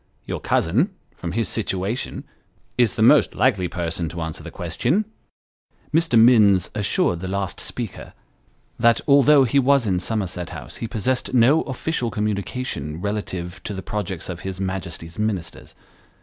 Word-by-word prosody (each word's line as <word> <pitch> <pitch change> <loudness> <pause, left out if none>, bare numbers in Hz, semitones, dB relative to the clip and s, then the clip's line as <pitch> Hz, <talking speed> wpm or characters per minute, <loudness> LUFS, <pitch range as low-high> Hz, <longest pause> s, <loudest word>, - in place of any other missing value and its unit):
Your - - -4
cousin, 130 - +1 0.2
from 85 -1 -5
his 115 +2 0
situation, 105 +2 -3 0.5
is 120 -5 +2
the 110 - +1
most 145 +5 +5
likely 100 -9 +2
person 85 -1 -3
to 85 +2 -6
answer 80 -1 -5
the - - -8
question." 210 +6 -1 0.9
Mr. 160 -6 +3
Minns 105 -6 +5
assured 100 -4 +1
the 95 - -5
last 95 0 -3
speaker, 120 -5 -5 0.7
that 115 0 +4
although 140 0 +6
he 130 +3 +2
was 135 -1 +3
in 95 -4 +1
Somerset 90 -4 -3
House, - - -8
he 115 - -4
possessed 125 +4 -1
no 130 +7 +5
official 130 -1 -2
communication 105 - -3
relative 95 -3 -4
to 105 - -5
the 95 - -6
projects 100 -2 -4
of 90 -2 -5
his 95 +1 -6
Majesty's 90 -2 -5
Ministers. 100 -6 -3
105 Hz, 150 wpm, -22 LUFS, 90-125 Hz, 0.9 s, although